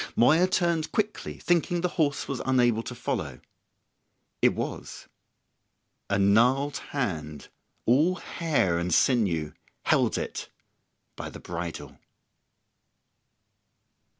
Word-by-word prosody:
Moya 160 +9 +5
turned 170 -4 0
quickly, 215 0 -2
thinking 175 0 +1
the 180 - 0
horse 145 -5 0
was 140 - -3
unable 120 -4 +3
to 125 - -7
follow. 120 - -3 1.0
It - - +4
was. - - -6 1.0
A 100 - +2
gnarled 125 +8 +3
hand, 80 - -3 0.4
all 150 +10 +4
hair 150 - 0
and 90 +1 -2
sinew, 85 - +2 0.3
held - - +2
it - - -5 0.7
by - - -6
the - - -10
bridle. 85 -1 -6
125 Hz, 100 wpm, -27 LUFS, 100-160 Hz, 1.0 s, Moya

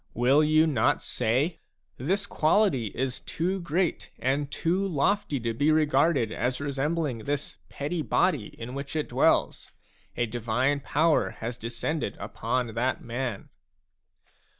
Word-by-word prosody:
Will 130 +6 +4
you 155 +1 +4
not 130 -8 +2
say: 130 +8 0 0.2
" - - -45
This 190 +10 0
quality 160 - +2
is 130 +4 -3
too 185 +4 -2
great 175 +1 -1
and 140 +2 0
too 180 +6 0
lofty 160 -2 +1
to 115 0 -1
be 145 +7 +2
regarded 155 -5 +3
as 125 +3 -1
resembling 145 -1 -1
this 145 +5 -3
petty 150 +4 -3
body 145 - +1
in 120 +2 -9
which 140 +2 -5
it 155 - -1
dwells? - - +2 0.5
A 120 - +2
divine 120 +5 0
power 155 +3 +2
has 115 +2 -5
descended 115 +2 -3
upon 115 +3 -2
that 125 +3 -1
man." 120 -3 -4
140 Hz, 135 wpm, -27 LUFS, 120-160 Hz, 0.5 s, Will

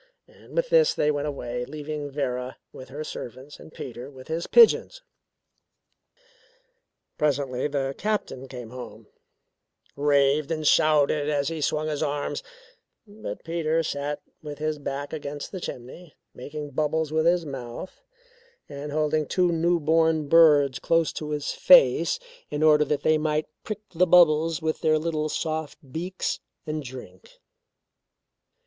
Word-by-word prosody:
And - - -17
with - - +1
this 485 -1 +4
they 150 - +2
went 145 0 -2
away, 125 -4 -4
leaving 150 +2 -5
Vera 130 -3 -3 0.2
with 130 -1 -11
her 145 +3 -6
servants 135 0 -8
and - - -13
Peter 125 -1 -8
with 130 -1 -14
his 165 +2 -2
pigeons. 480 +2 +5 2.2
Presently 140 -3 0
the 140 -2 -2
Captain 205 -11 -2
came 125 -3 -9
home, 115 -3 -9 0.9
raved 140 0 +2
and 155 -2 -2
shouted 150 -1 +3
as 145 -2 0
he 165 -2 -4
swung 155 +1 0
his 150 -2 -2
arms 145 0 -2 0.6
but 205 - -8
Peter 165 -1 0
sat 145 -1 -3 0.2
with 150 -1 -7
his 155 0 -2
back 140 +1 -5
against 145 -1 -6
the 185 - -6
chimney, 145 +7 -8 0.2
making 145 +3 -7
bubbles 155 +2 0
with 160 +1 +2
his 175 -1 +3
mouth 135 +4 -7 0.7
and 145 0 -7
holding 155 0 0
two 180 -2 +2
new 170 +1 +2
born 160 0 +2
birds 145 -4 +5
close 165 -1 +1
to 150 - -5
his 150 -1 -2
face - - +5 0.3
in 150 +1 -2
order 150 -1 +6
that 150 -1 -1
they 155 0 +3
might 155 0 0 0.2
prick 215 -1 -5
the 180 +2 +3
bubbles 165 -2 +4
with 160 0 -1
their 155 -1 +3
little 155 -1 -2
soft 155 0 -3
beaks 180 +5 -3 0.3
and 155 -1 -3
drink. 125 -9 -11
150 Hz, 140 wpm, -25 LUFS, 140-160 Hz, 2.2 s, order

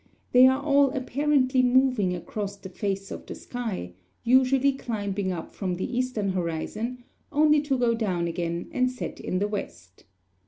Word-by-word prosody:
They 250 +1 +8
are 260 +1 +3
all 280 -1 +4
apparently 265 0 +2
moving 250 -7 +3
across 200 +3 -5
the 190 - -10
face 195 +1 -3
of - - -7
the - - -6
sky, 220 - -5 0.3
usually 260 +2 +4
climbing 205 -6 -3
up 170 -3 -6
from 185 -3 -2
the 185 +7 -4
eastern 250 -5 -1
horizon, 190 +8 -3 0.3
only 300 0 +4
to 285 -2 0
go 240 -2 +2
down 185 -7 -1
again 170 0 -3
and 255 -4 +2
set 250 0 -6
in 185 - -2
the 205 +2 +1
west. 95 - -7
230 Hz, 160 wpm, -26 LUFS, 190-260 Hz, 0.3 s, They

